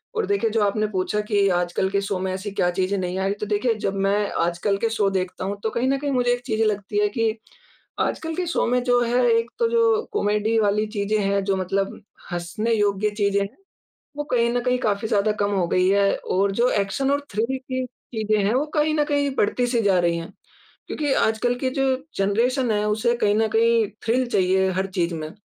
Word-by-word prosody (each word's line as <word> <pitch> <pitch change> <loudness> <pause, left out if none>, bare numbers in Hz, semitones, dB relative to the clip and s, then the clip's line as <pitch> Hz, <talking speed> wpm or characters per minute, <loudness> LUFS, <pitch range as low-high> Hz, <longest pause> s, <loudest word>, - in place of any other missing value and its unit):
और 450 - 0
देखिए 400 - +1
जो 225 0 +1
आपने 215 +1 +1
पूछा 205 +1 -1
कि 200 -2 +3
आजकल 175 +2 -1
के 200 0 +1
शो 200 -2 -2
में 190 0 -2
ऐसी 190 +2 -5
क्या 180 -2 +1
चीज़ें 185 +2 -1
नहीं 180 -1 -3
आईं, 195 +1 0
तो 205 +1 -5
देखिए 210 +3 +1
जब 200 -2 -2
मैं 205 +1 +1
आजकल 175 +4 0
के 225 +3 0
शो 210 -3 +1
देखता 185 -1 -3
हूँ 200 +1 -3
तो 220 - 0
कहीं 245 +2 0
न 275 - +2
कहीं 285 0 -2
मुझे 245 -2 +2
एक 245 - -3
चीज़ें 220 -3 0
लगती 205 - -1
है 415 0 +2
कि 225 - 0 0.7
आजकल 320 0 -2
के 365 - -2
शो 335 - 0
में 250 +1 +2
जो 245 -1 +3
है 240 +1 +2
एक 230 +1 +1
तो 470 - +3
जो 460 -2 +3
कॉमेडी 210 - +1
वाली 210 0 +2
चीज़ें 210 0 -1
हैं, 200 0 +1
जो 195 0 0
मतलब 195 +3 -2 0.3
हँसने 175 +6 -2
योग्य 205 -1 +1
चीज़ें 200 -1 +1 0.7
वो 295 - -2
कहीं 235 -1 +3
न 245 - +1
कहीं 250 0 +1
काफ़ी 210 -2 -1
ज़्यादा 215 0 +2
कम 205 0 +1
हो 185 -3 +1
गई 185 +1 +2
हैं, 200 0 +3
और 195 +2 0
जो 235 +5 +2
एक्शन 210 +7 0
और 285 - +1
थ्रिल 230 +6 -1
की 260 0 -4
चीज़ें 220 -3 -3
हैं 210 - +2
वो 270 +4 +1
कहीं 305 0 +2
न 300 - +3
कहीं 285 -1 0
बढ़ती-सी 240 +2 +1
जा 195 -3 +3
रही 170 -1 +1
हैं। 165 0 -7 0.6
क्योंकि 290 -3 -1
आजकल 230 +2 +1
की 260 - 0
जो 270 +1 0 0.3
जनरेशन 235 +5 +1
है 210 -1 +1
उसे 230 +3 +1
कहीं 205 -3 +2
न 220 0 +2
कहीं 230 -1 +3 0.2
थ्रिल 250 +3 +1
चाहिए 190 -1 +2
हर 190 +1 -1
चीज़ 170 0 +1
में, 155 -1 -5
215 Hz, 220 wpm, -23 LUFS, 195-245 Hz, 0.7 s, कि